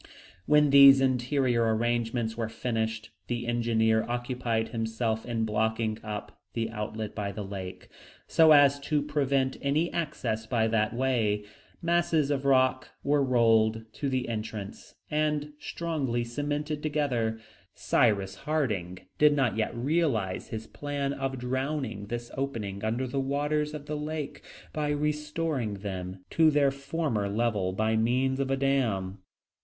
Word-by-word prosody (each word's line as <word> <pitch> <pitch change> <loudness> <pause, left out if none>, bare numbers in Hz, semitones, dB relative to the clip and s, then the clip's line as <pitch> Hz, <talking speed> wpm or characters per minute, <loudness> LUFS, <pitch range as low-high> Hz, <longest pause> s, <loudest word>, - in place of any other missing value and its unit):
When 150 -1 +5
these 140 -1 +9
interior 125 -3 +2
arrangements 120 0 -1
were 115 -1 -2
finished, 110 -1 -3 0.2
the 120 -1 -2
engineer 115 -2 +2
occupied 120 -2 -1
himself 110 0 -2
in 115 -2 0
blocking 110 0 0
up 105 -1 -7
the 115 -1 -2
outlet 110 -1 -4
by 100 -2 -3
the 105 - -5
lake, 95 -2 -7 0.4
so 160 -1 +5
as 145 -1 +6
to 145 +1 0
prevent 140 -3 0
any 150 +5 0
access 115 -9 -2
by 115 -1 +1
that 110 0 +1
way. 115 -5 +1 0.4
Masses 165 -4 +2
of 140 -1 -1
rock 130 -1 +3
were 145 0 +3
rolled 115 -3 +3
to 140 - -2
the 130 -1 -1
entrance 110 -3 -6 0.2
and 150 -1 0
strongly 145 -10 -2
cemented 145 +4 -3
together. 130 -8 0 0.4
Cyrus 100 -5 +2
Harding 100 - -2
did 150 -1 +6
not 135 -5 +1
yet 110 +1 -1
realize 125 - 0
his 110 0 -6
plan 140 +3 -3
of 135 -1 -3
drowning 130 -3 -3
this 120 +1 -5
opening 110 -8 -3
under 115 +4 0
the 130 +2 -2
waters 150 +2 -1
of 145 -1 -7
the 150 - -4
lake, 150 -1 -4 0.3
by 150 -1 -1
restoring 150 -5 -1
them 95 -2 -6
to 160 -1 +5
their 145 -2 +3
former 140 -6 -2
level 105 -3 0
by 110 +3 0
means 130 +4 +1
of 135 -1 0
a 135 - +1
dam. 115 -9 0
125 Hz, 140 wpm, -28 LUFS, 110-145 Hz, 0.4 s, these